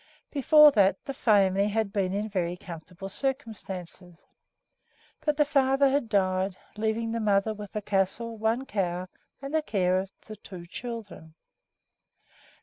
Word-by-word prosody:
Before 300 +2 +7
that 195 -6 +2
the 275 - -4
family 200 -5 +3
had 210 -1 -1
been 190 -3 0
in 205 +2 -2
very 180 -4 -2
comfortable 180 +2 -9
circumstances; 190 -7 -5 1.0
but 300 -1 +1
the 295 - +4
father 275 -1 +3
had 270 -4 0
died, 190 -2 +1 0.2
leaving 220 +1 -1
the 230 - -1
mother 210 0 +2
with 210 -2 -9
the 210 - -4
castle, 205 +4 -1
one 225 +4 0
cow, 185 -5 -2 0.3
and 275 +2 -5
the 315 - +3
care 185 -8 +1
of 190 +1 -5
the 215 -1 -9
two 180 -3 -10
children. 205 -6 -8
205 Hz, 145 wpm, -27 LUFS, 185-230 Hz, 1.0 s, Before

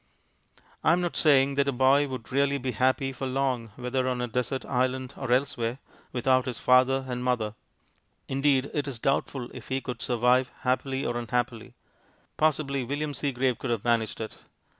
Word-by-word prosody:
I 160 - +5
am 180 - +2
not 175 -1 -2
saying 140 -3 +4
that 140 0 +1
a - - +2
boy 135 +3 +4
would 130 -4 -7
really 140 +1 +2
be 130 -1 -3
happy 130 +3 +1
for 135 +1 -4
long, 130 -3 -1
whether 130 +1 -1
on 125 -1 -1
a 125 - -1
desert 125 +2 -2
island 130 +1 -1
or 130 -3 -4
elsewhere, 125 -2 +1 0.3
without 130 +1 +2
his 125 -3 -3
father 130 +1 +4
and 125 -1 -3
mother. 120 -4 0 0.7
Indeed 135 0 +1
it 145 -1 -1
is 135 -4 -5
doubtful 135 0 -1
if 125 - -10
he 130 0 -1
could 120 -2 -6
survive, 125 +2 +2
happily 130 +1 0
or 120 - -1
unhappily. 120 0 -2 0.6
Possibly 140 -3 +1
William 145 +4 -3
Seagrave 130 -3 0
could 130 - -4
have 115 -4 -1
managed 115 -2 +1
it. 110 -1 -6
130 Hz, 175 wpm, -27 LUFS, 125-135 Hz, 0.7 s, I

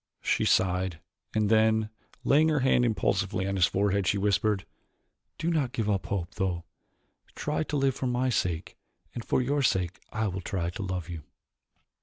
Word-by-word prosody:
She - - +1
sighed, 90 -2 +2 0.4
and 110 -1 +2
then, 110 0 +3 0.3
laying 155 +3 +4
her 150 -3 +2
hand 125 -1 +4
impulsively 100 -3 0
on 100 0 -1
his 90 -1 +4
forehead, 100 -1 +1
she 100 - +2
whispered, 100 0 +1 0.7
"Do 170 +1 -1
not 140 -7 0
give 115 -5 -1
up 100 -2 0
hope, 95 -2 -3
though. 90 -4 -1 0.7
Try 150 +1 -1
to 150 - -2
live 135 -1 +2
for 130 0 -3
my 125 +1 +1
sake 90 -8 -1 0.4
and 120 - -5
for 130 - +1
your 145 +3 +1
sake 90 -8 +1
I 110 0 -1
will 95 -1 -3
try 85 -2 -2
to 95 - -6
love 90 -4 -3
you." 85 -2 -6
105 Hz, 175 wpm, -28 LUFS, 95-125 Hz, 0.7 s, laying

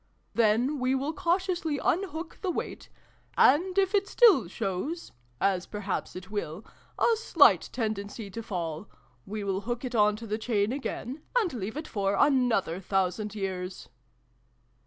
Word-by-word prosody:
" - - -42
Then 235 +6 +2
we 255 +1 +1
will 280 +4 -1
cautiously 345 -2 0
unhook 340 +1 -2
the 380 - -1
weight: 350 - -4 0.5
and, 360 +8 +4
if 385 0 +3
it 400 -1 +2
still 390 - +5
shows 215 - -4 0.3
(as 190 -2 +1
perhaps 205 -2 -4
it 185 +2 -9
will) 205 -2 -4 0.3
a 465 - +4
slight 455 +1 +4
tendency 215 -2 -4
to 230 - -5
fall, 175 -4 -4 0.4
we 210 +1 -4
will 195 -1 -1
hook 240 +3 -3
it 250 - -4
on 210 -2 +4
to 230 +2 -8
the 215 0 -2
chain 215 -2 +1
again, 270 +1 -4 0.2
and 415 - +1
leave 220 +1 -4
it 310 - -5
for 200 -1 0
another 245 - +2
thousand 195 +2 -1
years." 185 -2 -4
225 Hz, 155 wpm, -28 LUFS, 195-300 Hz, 0.5 s, still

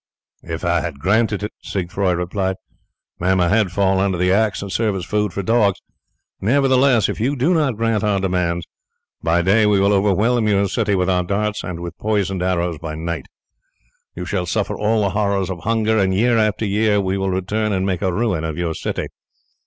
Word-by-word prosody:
"If 80 +1 -5
I 85 0 +2
had 85 -5 -5
granted 105 +6 +1
it," 105 - -3
Siegfroi 90 -1 -1
replied, 95 +2 -2 0.6
"may 95 +2 +2
my 90 -2 +2
head 105 -2 +2
fall 95 0 +2
under 95 -2 +1
the 90 +1 +2
axe 105 +1 +1
and 100 - -6
serve 110 -2 0
as 95 -2 -4
food 105 0 0
for 100 - -4
dogs. 105 -2 +2 0.6
Nevertheless, 130 0 +3
if - - -4
you 130 +6 0
do 140 +8 +2
not 145 -9 +1
grant 115 -2 0
our 105 -2 +1
demands, 90 -3 -1 0.6
by 85 +1 +1
day 105 +4 +4
we 105 -1 +3
will 100 +1 +3
overwhelm 105 +4 +2
your 100 -1 +2
city 105 0 0
with 90 -1 +1
our 90 -1 +2
darts, 105 +3 -2
and 85 -2 -5
with 85 -1 -7
poisoned 100 -3 -1
arrows 90 -3 -1
by 80 -1 -5
night. 85 +1 -4 0.9
You 90 - -5
shall 90 -1 -2
suffer 105 +3 -1
all 105 0 +1
the 100 - 0
horrors 100 -2 0
of 90 - -5
hunger, 110 +2 +1
and 95 -1 +1
year 120 +4 +3
after 110 0 +1
year 105 +1 +2
we 95 -1 -1
will 95 0 -1
return 100 +4 -1
and 95 -1 0
make 95 -3 -1
a 95 -2 +1
ruin 100 -5 -1
of 80 -2 -4
your 85 -2 -1
city." - - -3
100 Hz, 200 wpm, -20 LUFS, 90-110 Hz, 0.9 s, day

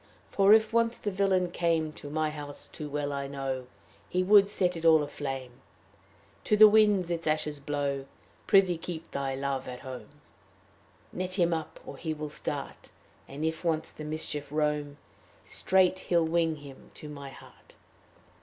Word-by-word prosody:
"For 200 0 +4
if 220 +1 +5
once 230 0 +2
the 205 - -3
villain 185 -2 +1
came 165 -3 0
To 145 - -9
my 155 +1 -1
house, 145 -1 -6
too 150 -3 -8
well 145 0 -2
I 140 0 -3
know 135 -2 -4 0.4
He 180 +1 +1
would 200 +1 +6
set 180 -3 0
it 165 - -7
all 160 -2 +6
aflame 135 -3 -5 0.9
To 210 - +3
the 215 +1 +10
winds 210 -4 +4
its 165 -1 -3
ashes 155 -1 0
blow. 140 -1 -2 0.4
"Prithee 190 -4 +4
keep 165 -1 -7
thy 135 -1 -2
Love 135 -1 -3
at 125 0 -7
home; 130 -1 -8 1.0
Net 185 0 -3
him 175 -3 +2
up 160 -1 -5
or - - -8
he 160 -2 -3
will 150 0 -5
start; 150 - -5 0.4
And 145 +3 -5
if 160 +1 -2
once 160 -1 -1
the 155 - -8
mischief 150 -2 -4
roam, 150 -1 -1 0.5
Straight 185 0 +2
he'll 170 -3 +1
wing 165 0 +1
him 140 -3 -13
to 150 - -9
my 140 -2 -8
heart." - - -16
155 Hz, 165 wpm, -29 LUFS, 145-180 Hz, 1.0 s, the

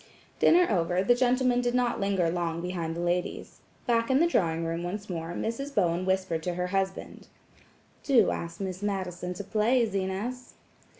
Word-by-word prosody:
Dinner 355 +1 +6
over, 180 -2 +1
the 245 - +5
gentlemen 250 0 +2
did 245 0 0
not 245 -1 +1
linger 195 -3 +1
long 170 -1 -2
behind 170 -2 -3
the - - -5
ladies. 175 +1 -2 0.3
Back 230 0 +1
in 265 +1 +4
the 335 - +5
drawing 165 - +1
room 165 +1 -2
once 195 +3 -5
more, 165 0 -4
Mrs. 275 +9 -4
Bowen 180 -2 +1
whispered 190 -3 0
to 175 +1 -3
her 180 0 -1
husband: 190 0 -3 0.7
"Do 250 -7 +4
ask 170 0 -5
Miss 190 -1 -4
Madison 180 -3 -3
to 205 - -5
play, 225 +5 +2
Zenas." 200 +6 -4
190 Hz, 170 wpm, -28 LUFS, 175-235 Hz, 0.7 s, Dinner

